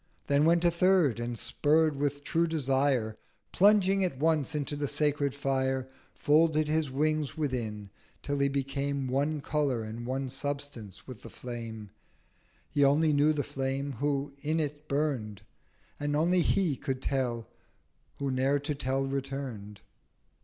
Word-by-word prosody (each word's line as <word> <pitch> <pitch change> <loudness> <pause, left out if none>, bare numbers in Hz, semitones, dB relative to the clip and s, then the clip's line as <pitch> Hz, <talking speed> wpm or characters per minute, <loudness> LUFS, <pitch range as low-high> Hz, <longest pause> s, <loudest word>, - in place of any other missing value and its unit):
Then 145 +1 +3
went 170 +1 +4
a 170 - +5
Third, 170 - +3
and 120 0 -3
spurr'd 155 +5 +2
with 145 0 -2
true 165 +3 +1
Desire, 135 -7 0 0.3
Plunging 195 -1 +4
at 175 -8 -1
once 155 -1 +1
into 145 0 -2
the 145 0 -2
sacred 145 -1 0
Fire, 135 -1 0 0.4
1290 - - -24
Folded 155 0 +4
his 155 -1 +1
Wings 155 +2 0
within, 110 -9 -3 0.3
till 145 0 -2
he 140 - +3
became 140 0 -2
One 145 +4 0
Colour 140 -6 0
and 115 +2 -6
one 135 +1 -2
Substance 140 -6 -5
with 125 -5 -10
the - - -10
Flame. 115 -4 -7 0.8
He 145 - +3
only 150 +3 +4
knew 145 +2 +4
the 150 -2 -1
Flame 135 +2 -3
who 140 0 -1
in 155 +2 0
it 150 0 -3
burn'd; 125 -9 -2 0.6
And 145 0 -1
only 175 +4 +3
He 175 -3 +2
could 135 -1 -4
tell 125 -4 -1 0.7
who 140 -1 -2
ne'er 135 +2 +2
to 145 +2 -2
tell 135 -1 -1
return'd. 135 -7 -5
140 Hz, 150 wpm, -29 LUFS, 130-150 Hz, 0.8 s, a